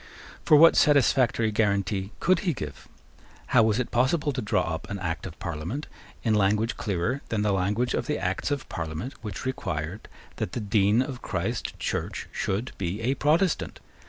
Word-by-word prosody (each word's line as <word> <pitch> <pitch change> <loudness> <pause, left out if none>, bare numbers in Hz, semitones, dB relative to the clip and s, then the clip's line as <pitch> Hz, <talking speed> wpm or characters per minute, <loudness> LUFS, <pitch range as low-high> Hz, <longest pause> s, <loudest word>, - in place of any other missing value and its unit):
For 150 - +6
what 165 +2 +8
satisfactory 130 -6 +4
guarantee 100 -2 0
could 185 0 +3
he 175 -4 0
give? 75 -9 -7 0.7
How - - +7
was 110 -1 +3
it 125 - -2
possible 145 +5 +2
to 130 - -2
draw 105 0 +1
up 80 - -6
an 100 - -3
Act 90 -1 -3
of 80 - -10
Parliament 85 - -4 0.4
in 110 - +2
language 105 +2 +2
clearer 105 +7 -1
than 105 -2 0
the 105 -1 +2
language 105 +6 0
of - - -1
the 150 - 0
Acts 90 +7 -1
of 145 -2 -2
Parliament 80 - -4
which 105 +1 -6
required 85 -6 -3 0.3
that - - -3
the - - -2
Dean 105 +2 +3
of 130 -2 -7
Christ - - -3
Church - - -3
should 105 +7 -2
be 95 +2 -2
a 125 +4 +1
Protestant? 155 +5 +1
110 Hz, 175 wpm, -26 LUFS, 95-130 Hz, 0.7 s, what